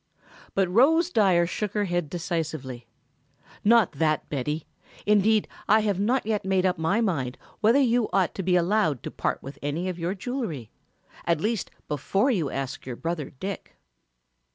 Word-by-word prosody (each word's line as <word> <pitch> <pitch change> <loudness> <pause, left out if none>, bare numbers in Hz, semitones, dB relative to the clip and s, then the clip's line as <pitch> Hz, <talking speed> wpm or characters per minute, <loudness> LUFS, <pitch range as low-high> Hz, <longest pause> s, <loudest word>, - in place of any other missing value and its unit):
But 195 -1 +3
Rose 310 - +4
Dyer 185 - +4
shook 205 +3 -3
her 210 -1 +1
head 175 -4 -1
decisively. 155 -8 -4 0.8
"Not 225 -2 +5
that, 155 +1 0
Betty; 150 +3 -2 0.4
indeed 210 +1 +3 0.2
I 215 +2 +5
have 205 -3 0
not 240 +5 +1
yet 215 -1 0
made 190 -1 +1
up 185 -1 +1
my 190 +8 +1
mind 135 - -1 0.2
whether 225 +4 +4
you 240 -4 +2
ought 190 -3 +2
to - - -4
be 180 0 +2
allowed 175 - +2
to - - -5
part - - -2
with 135 +1 -9
any 155 +6 -2
of 180 -1 -5
your 175 +4 -2
jewelry, 190 - -4 0.5
at 170 -2 +2
least 215 +2 -1 0.2
before 195 - +1
you 170 - 0
ask 135 -1 -4
your 125 -2 -6
brother 165 0 -3
Dick." 190 +9 -7
185 Hz, 165 wpm, -26 LUFS, 155-215 Hz, 0.8 s, Not